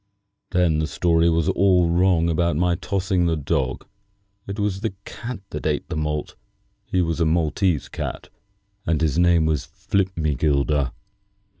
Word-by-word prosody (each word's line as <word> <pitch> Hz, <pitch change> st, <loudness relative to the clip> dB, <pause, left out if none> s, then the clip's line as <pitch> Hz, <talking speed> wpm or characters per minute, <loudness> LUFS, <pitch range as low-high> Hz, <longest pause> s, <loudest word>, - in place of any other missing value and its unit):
Then 90 Hz, -4 st, +2 dB
the 80 Hz, -, 0 dB
story 85 Hz, 0 st, +2 dB
was 80 Hz, -1 st, +1 dB
all 90 Hz, -3 st, +3 dB
wrong 85 Hz, 0 st, +3 dB
about 85 Hz, 0 st, +1 dB
my 90 Hz, +2 st, +2 dB
tossing 90 Hz, 0 st, 0 dB
the 80 Hz, -, +1 dB
dog. 65 Hz, -3 st, -1 dB, 0.6 s
It 100 Hz, +1 st, -5 dB
was 100 Hz, -2 st, -1 dB
the 110 Hz, -4 st, -2 dB
cat 120 Hz, -3 st, -7 dB
that 75 Hz, -, -3 dB
ate 75 Hz, -2 st, -1 dB
the -, -, -3 dB
malt. 75 Hz, -1 st, -2 dB, 0.5 s
He 90 Hz, -1 st, +1 dB
was 85 Hz, 0 st, -2 dB
a 85 Hz, -, +3 dB
Maltese 80 Hz, 0 st, +1 dB
cat, -, -, -6 dB, 0.5 s
and 80 Hz, -3 st, 0 dB
his 80 Hz, 0 st, +1 dB
name 85 Hz, -2 st, +4 dB
was 75 Hz, -3 st, 0 dB
Flipmegilder." 75 Hz, -7 st, 0 dB
85 Hz, 150 wpm, -23 LUFS, 75-90 Hz, 0.6 s, name